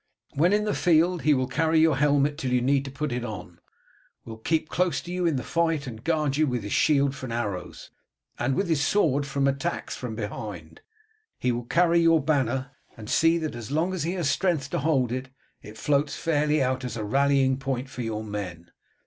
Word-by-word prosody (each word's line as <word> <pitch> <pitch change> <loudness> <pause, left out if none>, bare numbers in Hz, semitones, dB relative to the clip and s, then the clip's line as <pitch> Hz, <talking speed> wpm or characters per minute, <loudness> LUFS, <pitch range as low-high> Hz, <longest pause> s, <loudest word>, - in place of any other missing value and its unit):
When 170 +6 +3
in 210 +1 +2
the 210 - 0
field 175 0 +3
he 150 -1 +4
will 130 -1 +1
carry 160 +3 +2
your 160 -2 +4
helmet 145 +1 +2
till 130 -5 -2
you 125 - +3
need 135 +2 +2
to 135 - -6
put 150 +2 -3
it 120 0 -2
on; 110 -3 -7 0.7
will 110 -1 -9
keep 160 +7 0
close 180 +1 0
to 175 - -8
you 180 -1 0
in 160 - +1
the 130 - -2
fight 165 -3 0
and 115 -3 -8
guard 155 -4 0
you 155 0 +3
with 125 -4 -2
his 100 - -4
shield 140 -3 +3
from 130 -3 -7
arrows, 105 -6 -4 0.5
and 130 +2 0
with 195 - 0
his 160 -4 +1
sword 145 -6 +2
from 140 0 0
attacks 135 0 -2
from 120 -3 -6
behind; 105 -6 -7 0.6
he 125 - 0
will 120 0 -3
carry 170 +5 +3
your 165 -1 +5
banner, 135 -3 0 0.3
and 110 -1 -7
see 165 +1 +4
that 160 -2 -3
as 120 -1 -7
long 160 +6 0
as 185 - -3
he 165 +4 -1
has 175 -6 -1
strength 150 -4 0
to - - 0
hold 135 -5 +1
it, 130 +1 -4 0.3
it 105 +1 -11
floats 145 0 +1
fairly 150 -2 +1
out 130 0 -1
as 120 -2 -4
a 110 - -3
rallying 135 +2 +2
point 135 -1 -3
for 125 - -7
your 110 -2 -3
men. 95 -5 -6
140 Hz, 215 wpm, -26 LUFS, 125-160 Hz, 0.7 s, your